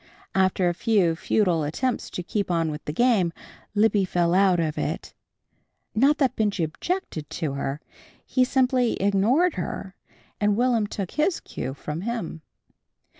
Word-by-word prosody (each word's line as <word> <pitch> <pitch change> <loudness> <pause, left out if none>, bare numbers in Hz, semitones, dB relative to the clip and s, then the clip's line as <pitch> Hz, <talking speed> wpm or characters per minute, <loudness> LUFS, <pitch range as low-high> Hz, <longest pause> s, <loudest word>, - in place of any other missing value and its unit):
After 190 -1 +2
a 175 - +2
few 180 -4 +2
futile 175 -1 +1
attempts 240 - -2
to 180 - -5
keep 200 +2 -2
on 165 -2 +1
with 150 +1 -7
the - - -2
game, 205 -2 +3 0.4
Libby 210 -1 +3
fell 175 -2 +1
out 185 -2 +4
of 155 -2 0
it. - - -3 0.8
Not 275 +7 +4
that 270 -5 +1
Benjy 205 -5 0
objected 160 - -3
to 150 -4 -3
her. 140 +1 -3 0.4
He 255 - +2
simply 255 -2 +2
ignored 220 - +2
her, 190 +2 -4 0.5
and 205 0 +2
Will'm 240 -3 +2
took 195 -3 -5
his 315 +4 +1
cue 130 +2 -6
from 150 +3 -5
him. 210 -7 -4
195 Hz, 150 wpm, -25 LUFS, 170-240 Hz, 0.8 s, out